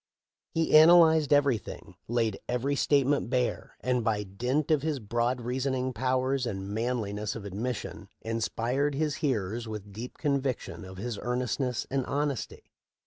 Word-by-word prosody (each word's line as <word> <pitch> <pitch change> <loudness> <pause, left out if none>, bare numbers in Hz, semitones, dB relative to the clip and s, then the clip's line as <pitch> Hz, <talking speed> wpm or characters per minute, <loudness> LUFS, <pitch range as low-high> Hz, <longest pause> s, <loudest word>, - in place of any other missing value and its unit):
He 160 -1 +2
analyzed 160 -2 +7
everything, 140 -6 +1
laid 115 -3 0
every 125 +4 0
state 140 -1 +3
ment 140 -3 +1
bare, 125 -1 -1
and 125 -1 0
by 105 -2 0
dint 125 +11 -1
of 150 -3 +4
his 155 -1 -1
broad 120 +3 0
reasoning 130 +1 -1
pow 130 +3 0
ers 130 -1 0
and 95 -3 -4
manliness 110 -3 -2
of 110 -3 -7
admission 110 +5 -4
inspired 120 +5 -1
his 150 0 0
hearers 115 - -1
with 105 -2 -7
deep 115 +5 -7
conviction 140 -9 -2
of 95 0 -10
his 110 +1 -4
earnestness 125 0 -1
and 135 -1 +1
hon 145 +1 +1
esty. 130 - -7
125 Hz, 150 wpm, -29 LUFS, 115-140 Hz, -, analyzed